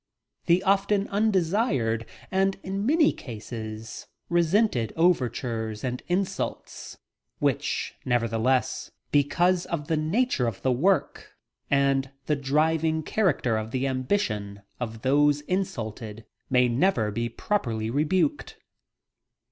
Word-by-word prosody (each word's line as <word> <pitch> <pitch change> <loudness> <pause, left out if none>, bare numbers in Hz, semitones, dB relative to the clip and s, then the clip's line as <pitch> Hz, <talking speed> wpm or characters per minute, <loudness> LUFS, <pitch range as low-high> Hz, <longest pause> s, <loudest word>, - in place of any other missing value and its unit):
The 175 +2 +4
often 200 +1 +2
undesired 185 - +1 0.2
and 195 +1 +1
in 195 +3 -2
many 310 +1 +4
cases 110 -2 -7 0.2
resented 170 - +2
overtures 120 -9 0
and 125 0 -3
insults 185 +2 -3 0.4
which, - - -1
nevertheless, 125 +2 0 0.2
because 175 +5 +2
of 150 -4 -4
the 160 - +2
nature 160 - +1
of 110 -4 -5
the 130 - +2
work 160 +6 0 0.3
and 135 -1 +2 0.2
the 150 - +1
driving 155 +3 +1
character 150 - +1
of 110 0 -4
the 130 +3 -1
ambition 130 - -1 0.2
of 115 -2 -5
those 145 +2 +3
insulted, 115 - -4 0.2
may 125 -1 +4
never 120 - +1
be 115 +3 -2
properly 115 - -2
rebuked! 180 - 0
140 Hz, 110 wpm, -26 LUFS, 115-185 Hz, 0.4 s, The